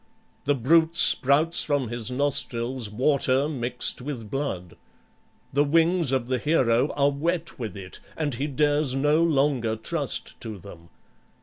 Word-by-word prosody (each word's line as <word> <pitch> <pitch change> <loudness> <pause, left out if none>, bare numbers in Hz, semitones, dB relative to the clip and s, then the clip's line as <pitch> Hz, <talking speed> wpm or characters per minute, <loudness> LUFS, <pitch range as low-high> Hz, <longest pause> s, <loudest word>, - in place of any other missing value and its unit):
The 145 - +2
brute 160 +6 +2
spouts 155 +1 +5
from 145 -5 -1
his 120 0 -3
nostrils 125 -3 -1
water 135 +3 +1
mixed 125 -4 -1
with 125 -6 -7
blood. 95 - -4 0.8
The 145 +2 +3
wings 165 0 +2
of 130 -3 0
the 130 -1 -1
hero 130 -3 +2
are 140 0 +2
wet 165 +3 -3
with 110 -5 -6
it, 95 -2 -8 0.2
and 150 -3 -2
he 135 +5 -3
dares 145 -1 0
no 150 +4 +2
longer 135 -8 +1
trust 140 +6 -4
to 110 -4 -6
them. 85 -3 -14
135 Hz, 140 wpm, -24 LUFS, 120-150 Hz, 0.8 s, spouts